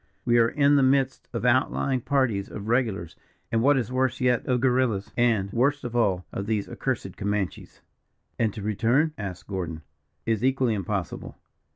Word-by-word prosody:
We 120 Hz, -1 st, +4 dB
are 115 Hz, 0 st, +4 dB
in 145 Hz, +1 st, +3 dB
the -, -, +4 dB
midst 135 Hz, 0 st, +1 dB
of 115 Hz, 0 st, -3 dB
out 130 Hz, +2 st, +3 dB
laying 130 Hz, -2 st, -1 dB
parties 120 Hz, -7 st, 0 dB
of 105 Hz, 0 st, -7 dB
regulars 110 Hz, -9 st, 0 dB, 0.4 s
and, 115 Hz, -, +2 dB
what 140 Hz, +3 st, +4 dB
is 125 Hz, -1 st, -2 dB
worse 130 Hz, -1 st, 0 dB
yet, 125 Hz, -2 st, +2 dB
of 125 Hz, -1 st, +2 dB
guerrillas; 125 Hz, -5 st, +1 dB
and, 110 Hz, -5 st, +1 dB
worst 140 Hz, +5 st, +1 dB
of 120 Hz, -1 st, -5 dB
all, 95 Hz, -6 st, +1 dB
of 100 Hz, -, -4 dB
these 105 Hz, -2 st, -1 dB
accursed -, -, -3 dB
Comanches." 100 Hz, -4 st, -3 dB, 0.6 s
"And 110 Hz, -2 st, +2 dB
to 105 Hz, -, -6 dB
return?" 120 Hz, +9 st, +1 dB
asked 95 Hz, -4 st, -6 dB
Gordon. 85 Hz, -5 st, -5 dB, 0.4 s
"Is 115 Hz, -1 st, 0 dB
equally 130 Hz, -3 st, +2 dB
impossible." 95 Hz, -2 st, -4 dB
115 Hz, 175 wpm, -26 LUFS, 100-130 Hz, 0.6 s, We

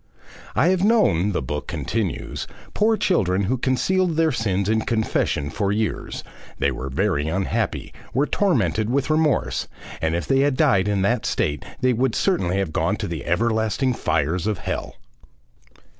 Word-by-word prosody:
"'I 160 Hz, -, +4 dB
have 185 Hz, 0 st, +2 dB
known,' 200 Hz, -, +3 dB
the 90 Hz, -, -1 dB
book 75 Hz, +3 st, -4 dB
continues, 110 Hz, -8 st, -3 dB, 0.3 s
'poor 220 Hz, +1 st, +2 dB
children 100 Hz, -, +1 dB
who 115 Hz, +7 st, +1 dB
concealed 165 Hz, +8 st, +1 dB
their 160 Hz, 0 st, +3 dB
sins 100 Hz, -6 st, 0 dB
in 110 Hz, +1 st, +2 dB
confession 110 Hz, -, 0 dB
for 100 Hz, -2 st, -1 dB
years; 110 Hz, +1 st, -2 dB, 0.3 s
they -, -, +1 dB
were 65 Hz, +1 st, -5 dB
very 80 Hz, 0 st, 0 dB
unhappy, 95 Hz, +4 st, -2 dB, 0.2 s
were 140 Hz, +3 st, +2 dB
tormented 110 Hz, -, +1 dB
with 140 Hz, +4 st, 0 dB
remorse, 155 Hz, -2 st, +1 dB, 0.3 s
and 80 Hz, +1 st, +1 dB
if 85 Hz, -, -2 dB
they 135 Hz, -1 st, +2 dB
had 140 Hz, -1 st, +2 dB
died 95 Hz, 0 st, +3 dB
in 100 Hz, -2 st, +1 dB
that 115 Hz, +3 st, +1 dB
state 75 Hz, 0 st, -1 dB, 0.2 s
they 130 Hz, 0 st, +3 dB
would 125 Hz, 0 st, 0 dB
certainly 95 Hz, -, +1 dB
have 95 Hz, -5 st, -1 dB
gone 85 Hz, +6 st, +1 dB
to 105 Hz, -, -4 dB
the 85 Hz, -4 st, -4 dB
everlasting 110 Hz, +6 st, +1 dB
fires 80 Hz, 0 st, 0 dB
of 105 Hz, -3 st, 0 dB
hell. -, -, -4 dB
110 Hz, 160 wpm, -23 LUFS, 90-135 Hz, 0.3 s, I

